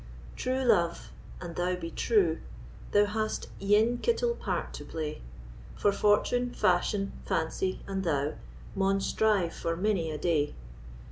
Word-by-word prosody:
True 260 Hz, +1 st, -1 dB
love, 175 Hz, -9 st, +2 dB, 0.3 s
an 175 Hz, -2 st, -6 dB
thou 180 Hz, +2 st, 0 dB
be 165 Hz, -2 st, -6 dB
true, 185 Hz, -8 st, +2 dB, 0.5 s
Thou 205 Hz, 0 st, +5 dB
has 215 Hz, +1 st, -2 dB, 0.2 s
ane 215 Hz, +4 st, +3 dB
kittle 470 Hz, 0 st, +1 dB
part -, -, -3 dB
to -, -, -7 dB
play; 155 Hz, -2 st, -5 dB, 0.5 s
For 205 Hz, -, +2 dB
fortune, 210 Hz, +5 st, +2 dB
fashion, 195 Hz, +2 st, +1 dB
fancy, 185 Hz, +3 st, -1 dB
and 195 Hz, -1 st, -3 dB
thou, 150 Hz, -3 st, 0 dB, 0.4 s
Maun 195 Hz, 0 st, +2 dB
strive 195 Hz, -4 st, +1 dB
for 165 Hz, -, -2 dB
many 185 Hz, -3 st, 0 dB
a 155 Hz, -, -3 dB
day. 150 Hz, -2 st, 0 dB
195 Hz, 135 wpm, -29 LUFS, 165-215 Hz, 0.5 s, Thou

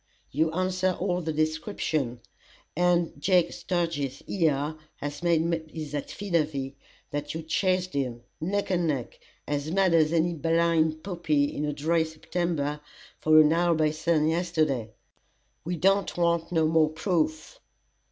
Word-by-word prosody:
You 160 Hz, +3 st, +1 dB
answer 185 Hz, +1 st, 0 dB
all 180 Hz, -1 st, 0 dB
the 160 Hz, -1 st, -2 dB
descriptions, 155 Hz, -, -1 dB, 0.5 s
and 175 Hz, 0 st, +2 dB
Jake 180 Hz, -1 st, +3 dB
Sturgis 165 Hz, -7 st, -2 dB
here, 155 Hz, -4 st, 0 dB, 0.2 s
has 145 Hz, +2 st, -6 dB
made 165 Hz, -1 st, +1 dB
his 155 Hz, -3 st, -6 dB
affidavy 150 Hz, -4 st, -2 dB, 0.4 s
that 145 Hz, +1 st, -4 dB
you 160 Hz, -, -4 dB
chased 185 Hz, +2 st, 0 dB
him, 125 Hz, -4 st, -2 dB, 0.2 s
neck 195 Hz, +5 st, -1 dB
and 175 Hz, -2 st, +1 dB
neck, 135 Hz, -6 st, -3 dB, 0.3 s
as 145 Hz, +1 st, -2 dB
mad 190 Hz, 0 st, +2 dB
as 155 Hz, -2 st, +4 dB
any 170 Hz, +1 st, +2 dB
blind 165 Hz, -1 st, +1 dB
puppy 160 Hz, -6 st, 0 dB
in 150 Hz, -, -1 dB
a 150 Hz, -, -1 dB
dry 160 Hz, +3 st, +1 dB
September, 160 Hz, -2 st, -2 dB, 0.4 s
for 155 Hz, 0 st, +6 dB
an 155 Hz, +1 st, +4 dB
hour 170 Hz, 0 st, +3 dB
by 155 Hz, -1 st, +2 dB
sun 155 Hz, 0 st, +1 dB
yesterday. 160 Hz, -8 st, 0 dB, 0.7 s
We 175 Hz, +2 st, -2 dB
don't 195 Hz, +3 st, +2 dB
want 170 Hz, -1 st, +1 dB
no 160 Hz, -2 st, +3 dB
more 160 Hz, -1 st, +4 dB
proof." 155 Hz, -1 st, -1 dB
160 Hz, 140 wpm, -27 LUFS, 150-175 Hz, 0.7 s, for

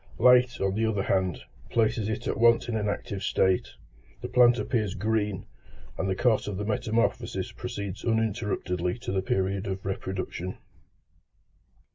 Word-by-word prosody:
Light, 125 Hz, -1 st, +5 dB
on 95 Hz, 0 st, +1 dB
the 110 Hz, +2 st, +1 dB
other 105 Hz, -3 st, 0 dB
hand, 95 Hz, -4 st, 0 dB, 0.3 s
places 110 Hz, -1 st, +1 dB
it 110 Hz, -, -3 dB
at -, -, -2 dB
once 115 Hz, 0 st, +5 dB
in 120 Hz, -, -2 dB
an 105 Hz, -1 st, 0 dB
active 100 Hz, -1 st, -4 dB
state; 95 Hz, -2 st, +1 dB, 0.5 s
the -, -, -4 dB
plant 120 Hz, -1 st, +5 dB
appears 110 Hz, -8 st, -1 dB
green, 105 Hz, -1 st, -1 dB, 0.5 s
and 95 Hz, -, -2 dB
the 95 Hz, -, +1 dB
course 115 Hz, +1 st, +2 dB
of 100 Hz, -2 st, -3 dB
the 105 Hz, -, -3 dB
metamorphosis 110 Hz, +1 st, -1 dB
proceeds 100 Hz, +2 st, -6 dB
uninterruptedly 105 Hz, -5 st, -1 dB
to 120 Hz, -, -5 dB
the 95 Hz, 0 st, 0 dB
period 95 Hz, +1 st, -1 dB
of 95 Hz, -1 st, -4 dB
reproduction. 95 Hz, -1 st, -4 dB
105 Hz, 150 wpm, -27 LUFS, 95-115 Hz, 0.5 s, Light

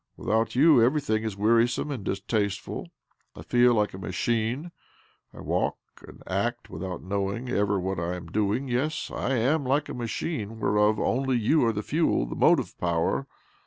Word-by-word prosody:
Without 110 Hz, +2 st, 0 dB
you 145 Hz, -1 st, +6 dB
everything 120 Hz, -4 st, +1 dB
is 110 Hz, -3 st, -4 dB
wearisome 115 Hz, +6 st, +2 dB
and 125 Hz, -8 st, -4 dB
distasteful. 100 Hz, +1 st, -2 dB, 0.5 s
I -, -, -9 dB
feel 120 Hz, 0 st, +4 dB
like 105 Hz, -1 st, +1 dB
a 95 Hz, -, -7 dB
machine, 115 Hz, -, -1 dB, 0.6 s
I -, -, -11 dB
walk -, -, -1 dB, 0.3 s
and -, -, -14 dB
act 120 Hz, +6 st, -2 dB
without 90 Hz, +2 st, -5 dB
knowing 100 Hz, +6 st, -2 dB
ever 100 Hz, -4 st, +1 dB
what 95 Hz, 0 st, -2 dB
I 85 Hz, +2 st, -2 dB
am 90 Hz, -1 st, -8 dB
doi'jig. 105 Hz, +8 st, 0 dB
Yes, 130 Hz, +6 st, -1 dB
I 135 Hz, -, -1 dB
am 135 Hz, +6 st, +2 dB
like 135 Hz, +3 st, 0 dB
a -, -, -4 dB
machine 115 Hz, -1 st, -4 dB
whereof 105 Hz, 0 st, +2 dB
only 130 Hz, 0 st, +1 dB
you 120 Hz, +7 st, +3 dB
are -, -, +3 dB
the 105 Hz, -1 st, -4 dB
fuel, 155 Hz, -, +1 dB
the -, -, -6 dB
motive -, -, +3 dB
power. 85 Hz, +10 st, 0 dB
110 Hz, 165 wpm, -26 LUFS, 100-125 Hz, 0.6 s, you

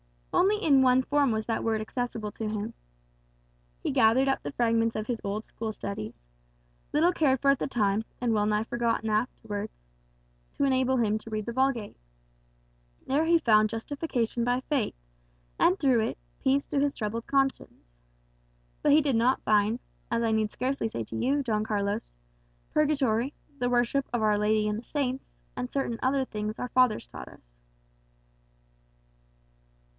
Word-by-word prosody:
Only 410 Hz, +3 st, +3 dB
in 275 Hz, -4 st, +5 dB
one 255 Hz, 0 st, +4 dB
form 285 Hz, 0 st, +2 dB
was 220 Hz, 0 st, -1 dB
that 225 Hz, -, -1 dB
Word 220 Hz, -1 st, +1 dB
accessible 220 Hz, -1 st, -4 dB
to 220 Hz, -, -5 dB
him. 215 Hz, +1 st, -3 dB, 1.1 s
He -, -, 0 dB
gathered 230 Hz, +5 st, +4 dB
up 270 Hz, -, 0 dB
the -, -, -6 dB
fragments 230 Hz, -2 st, +1 dB
of 215 Hz, -, -2 dB
his 235 Hz, -1 st, -3 dB
old 205 Hz, +2 st, -3 dB
school 225 Hz, -1 st, -5 dB
studies 120 Hz, -, -6 dB, 0.7 s
little 325 Hz, +4 st, +4 dB
cared 280 Hz, -7 st, +2 dB
for 275 Hz, -, +5 dB
at 275 Hz, -, +1 dB
the -, -, -1 dB
time, 215 Hz, -4 st, 0 dB
and 240 Hz, -2 st, +1 dB
well 210 Hz, -1 st, +2 dB
nigh 210 Hz, 0 st, +1 dB
forgotten 230 Hz, -1 st, -1 dB
afterwards 215 Hz, -1 st, -2 dB, 0.8 s
to -, -, -1 dB
enable 260 Hz, -1 st, +2 dB
him 215 Hz, -2 st, +1 dB
to 225 Hz, -, -11 dB
read 215 Hz, -1 st, -3 dB
the 235 Hz, -, -3 dB
Vulgate. 260 Hz, -4 st, 0 dB, 1.1 s
There 290 Hz, +4 st, +1 dB
he 335 Hz, +1 st, +5 dB
found 215 Hz, -8 st, +4 dB
justification 235 Hz, 0 st, -2 dB
by 245 Hz, +1 st, +1 dB
faith, 275 Hz, -3 st, -1 dB, 0.6 s
and, 185 Hz, -, +4 dB
through 260 Hz, -4 st, +3 dB
it, -, -, -5 dB, 0.2 s
peace 275 Hz, +1 st, +2 dB
to 285 Hz, -, 0 dB
his 285 Hz, 0 st, +1 dB
troubled 225 Hz, +1 st, -4 dB
conscience. 270 Hz, -, 0 dB, 1.0 s
But 290 Hz, -, +4 dB
he 310 Hz, -, +6 dB
did 275 Hz, -5 st, +1 dB
not 245 Hz, +3 st, +2 dB
find, 215 Hz, +2 st, +2 dB, 0.3 s
as 235 Hz, 0 st, 0 dB
I 225 Hz, -, +1 dB
need 220 Hz, -1 st, +1 dB
scarcely 260 Hz, -2 st, -1 dB
say 115 Hz, -, -4 dB
to 110 Hz, -, -8 dB
you, 275 Hz, -, +1 dB
Don 215 Hz, -4 st, 0 dB
Carlos, 205 Hz, 0 st, -2 dB, 0.6 s
purgatory, 275 Hz, -4 st, +1 dB, 0.3 s
the 245 Hz, -, +1 dB
worship 245 Hz, +3 st, +1 dB
of 235 Hz, -2 st, 0 dB
Our 210 Hz, -1 st, +3 dB
Lady 210 Hz, 0 st, +2 dB
and 210 Hz, 0 st, -1 dB
the -, -, -11 dB
saints, 265 Hz, -1 st, -3 dB, 0.3 s
and 250 Hz, 0 st, -4 dB
certain 235 Hz, -5 st, -2 dB
other 265 Hz, +1 st, +1 dB
things 215 Hz, -1 st, -4 dB
our 250 Hz, -, -4 dB
fathers 250 Hz, -4 st, +3 dB
taught -, -, -10 dB
us." -, -, -15 dB
235 Hz, 165 wpm, -28 LUFS, 215-270 Hz, 1.1 s, he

